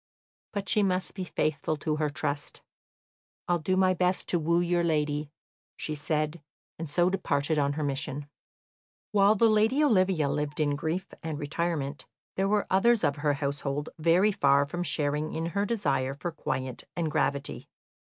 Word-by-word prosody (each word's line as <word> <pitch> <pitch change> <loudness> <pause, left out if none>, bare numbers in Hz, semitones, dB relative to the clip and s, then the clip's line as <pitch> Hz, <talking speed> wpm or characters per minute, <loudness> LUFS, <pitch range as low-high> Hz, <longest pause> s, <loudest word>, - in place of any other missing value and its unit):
But 200 -2 -4
she 210 - +3
must 185 -2 0
be 190 - -4
faithful 155 -3 -1
to 150 +1 -1
her 155 -1 0
trust. 145 -1 -3 0.8
"I'll 175 -1 +2
do 185 +4 0
my 185 -1 +4
best 180 +1 0
to 175 - +2
woo 170 +2 +2
your 175 0 +1
lady," 150 -2 0 0.5
she 155 - -4
said, 155 +1 -2 0.4
and 165 -2 -4
so 175 +4 +3
departed 155 -5 +1
on 140 0 +1
her 155 +1 -3
mission. 145 0 -3 0.8
While 205 0 +5
the 230 +2 +5
lady 220 +7 +3
Olivia 185 - +3
lived 150 +1 -2
in 145 -2 +2
grief 160 +5 -2 0.2
and 160 -2 -4
retirement, 150 -1 -2 0.3
there 195 +1 +1
were 210 0 +2
others 225 +4 +3
of 145 0 +1
her 145 0 +1
household 140 +1 -2
very 170 +6 +4
far 140 -6 +3
from 175 +5 -4
sharing 150 -2 -1
in 165 - -2
her 200 +1 +1
desire 140 - 0
for 175 +4 -4
quiet 130 -5 -4
and 165 -3 -1
gravity. 140 0 -1
155 Hz, 165 wpm, -28 LUFS, 145-185 Hz, 0.8 s, While